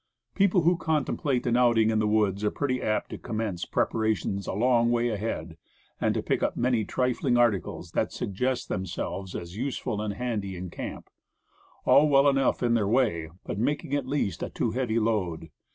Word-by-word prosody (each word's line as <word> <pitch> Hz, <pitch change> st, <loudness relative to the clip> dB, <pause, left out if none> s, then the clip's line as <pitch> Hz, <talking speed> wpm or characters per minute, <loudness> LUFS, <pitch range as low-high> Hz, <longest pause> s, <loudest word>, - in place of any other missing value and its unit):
People 195 Hz, -2 st, +3 dB
who 175 Hz, +1 st, +4 dB
contemplate 145 Hz, -4 st, 0 dB
an 120 Hz, -1 st, +2 dB
outing 120 Hz, -3 st, +4 dB
in 110 Hz, -, +1 dB
the 110 Hz, -, +1 dB
woods 105 Hz, -2 st, +1 dB
are 105 Hz, -, +3 dB
pretty 130 Hz, 0 st, -2 dB
apt 110 Hz, 0 st, -1 dB
to -, -, -6 dB
commence 110 Hz, -6 st, -3 dB
preparations 110 Hz, -3 st, -1 dB
a -, -, -2 dB
long 120 Hz, +2 st, +3 dB
way 120 Hz, 0 st, +2 dB
ahead, 95 Hz, -7 st, -4 dB, 0.4 s
and -, -, +1 dB
to -, -, -1 dB
pick -, -, 0 dB
up -, -, 0 dB
many 120 Hz, -2 st, +2 dB
trifling 125 Hz, +2 st, 0 dB
articles 115 Hz, -7 st, 0 dB
that -, -, 0 dB
sug -, -, -4 dB
Preparations. 95 Hz, -, -10 dB
7 130 Hz, +1 st, +3 dB
gest 125 Hz, -, -8 dB
themselves 95 Hz, 0 st, -4 dB
as 85 Hz, +1 st, -6 dB
useful 125 Hz, -4 st, -2 dB
and 105 Hz, -2 st, -3 dB
handy 105 Hz, -5 st, -3 dB
in 90 Hz, 0 st, -6 dB
camp; -, -, -7 dB, 0.8 s
all 150 Hz, +1 st, +6 dB
well 140 Hz, 0 st, +5 dB
enough 135 Hz, -2 st, +2 dB
in 120 Hz, -1 st, +3 dB
their 110 Hz, -4 st, +2 dB
way, 105 Hz, -9 st, +1 dB, 0.2 s
but 100 Hz, -, -4 dB
making 145 Hz, +4 st, -1 dB
at 140 Hz, -3 st, 0 dB
last 135 Hz, -8 st, -1 dB
a -, -, -3 dB
too 115 Hz, -, -1 dB
heavy 120 Hz, -2 st, -1 dB
load. 95 Hz, -8 st, -1 dB
115 Hz, 195 wpm, -27 LUFS, 100-130 Hz, 0.8 s, all